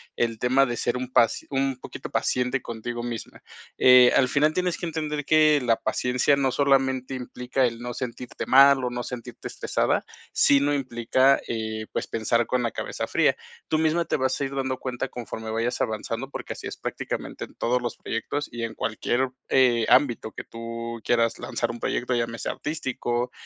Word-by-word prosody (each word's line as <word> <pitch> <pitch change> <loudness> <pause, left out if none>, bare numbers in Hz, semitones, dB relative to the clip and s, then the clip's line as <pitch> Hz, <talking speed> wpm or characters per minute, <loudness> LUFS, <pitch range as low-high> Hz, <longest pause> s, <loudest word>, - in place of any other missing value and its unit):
el 115 -2 -1
tema 130 +3 +4
de 120 -2 -3
ser 120 - 0
un 125 0 -5
pas 115 -2 +3
un 135 -1 0
poquito - - -8
paciente 125 +1 0
contigo 120 +1 -5
misma. 120 -2 -6 0.3
Eh, 125 -1 +8
al 130 - +4
final 150 +4 +2
tienes 180 -1 0
que 175 - -3
entender 150 -2 -3
que 155 -2 +5
la 115 -2 +3
paciencia 125 +5 +1
no 135 -2 +1
solamente 135 -1 +2
implica 125 0 -1
el 115 -1 -6
no 120 0 -4
sentirte 125 -1 -5
mal 135 0 +7
o 125 - 0
no 120 0 -4
sentirte 120 -2 -7
estresada, - - 0 0.3
sino 140 +1 +4
implica, 130 0 +2
eh, 110 -1 -3
pues, - - -3
pensar 115 +1 0
con 125 -1 0
la 115 - -1
cabeza - - -4
fría. - - +2 0.3
Tú 155 - +1
misma 160 +2 +2
te - - 0
vas 130 -1 0
a 140 - -1
ir 135 +1 -5
dando 130 -1 -1
cuenta 130 +1 -4
conforme 110 -3 -6
vayas 115 +2 -1
avanzando, 115 +4 -3
porque - - -6
así - - -10
es - - -7
prácticamente - - -5
en - - -10
todos 125 +1 0
los 120 -1 -4
proyectos 145 +6 -3
y 120 0 -6
en 115 -1 -3
cualquier, 120 +4 -1 0.2
eh, 120 -4 +4
ámbito 120 -5 +3
que - - -7
tú 115 0 -6
quieras 115 -1 +1
lanzar - - -2
un 120 - -8
proyecto, 125 +1 -1
llámese 115 -1 -2
artístico, 125 -4 -2
125 Hz, 185 wpm, -25 LUFS, 115-135 Hz, 0.3 s, Eh